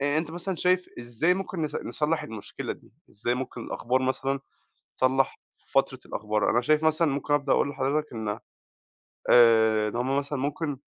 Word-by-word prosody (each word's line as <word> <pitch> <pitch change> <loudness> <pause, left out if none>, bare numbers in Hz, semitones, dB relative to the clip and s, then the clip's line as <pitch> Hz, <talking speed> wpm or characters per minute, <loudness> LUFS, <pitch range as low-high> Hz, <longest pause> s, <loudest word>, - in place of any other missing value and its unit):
آآ 145 +2 +2
أنت 160 -1 -3
مثلًا 175 +2 -4
شايف 180 +1 +2
إزاي 120 +9 +1
ممكن 190 -3 -4
نص 150 - -3
نصلّح 155 +1 -1
المشكلة 110 -8 -6
دي؟ - - -17 0.2
إزاي 120 +4 -1
ممكن 125 -1 -5
الأخبار 130 +2 -1
مثلًا 135 +1 -1 0.6
تتصلّح 130 +1 +2 0.2
في - - -23
فترة - - +2
الأخبار؟ 105 0 0
أنا 120 - +3
شايف 155 +4 +3
مثلًا 160 +1 +3
ممكن 145 +1 0
ابدأ 140 -1 +1
اقول 140 - +2
لحضرتك 140 +2 -1
إن 110 -2 -3 0.9
آآ 110 -2 +6
إن 105 - -8
هُم 130 +3 0
مثلًا 140 0 -2
ممكن 145 +1 -2
135 Hz, 170 wpm, -27 LUFS, 120-155 Hz, 0.9 s, آآ